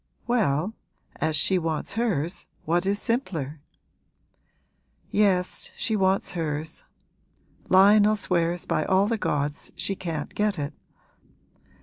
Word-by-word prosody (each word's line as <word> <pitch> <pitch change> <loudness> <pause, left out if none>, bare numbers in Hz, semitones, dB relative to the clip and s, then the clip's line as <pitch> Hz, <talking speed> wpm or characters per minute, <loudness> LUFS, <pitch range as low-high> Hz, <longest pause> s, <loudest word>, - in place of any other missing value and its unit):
'Well, 205 - +1 0.4
as 160 - 0
she 185 +5 +2
wants 165 +1 -2
hers 195 -8 -1 0.2
what 175 +4 +1
is 200 +1 +1
simpler?' 175 - -2 1.5
'Yes, 190 -3 +1
she 220 - -1
wants 190 -1 +1
hers. 155 -2 -3 0.9
Lionel 205 +3 +6
swears 175 -3 0
by 155 - 0
all 190 +4 +3
the 225 +1 -1
gods 145 -3 -2
she 195 - -2
can't 165 -5 -4
get 210 -1 0
it.' 145 -1 -3
185 Hz, 110 wpm, -26 LUFS, 155-205 Hz, 1.5 s, Lionel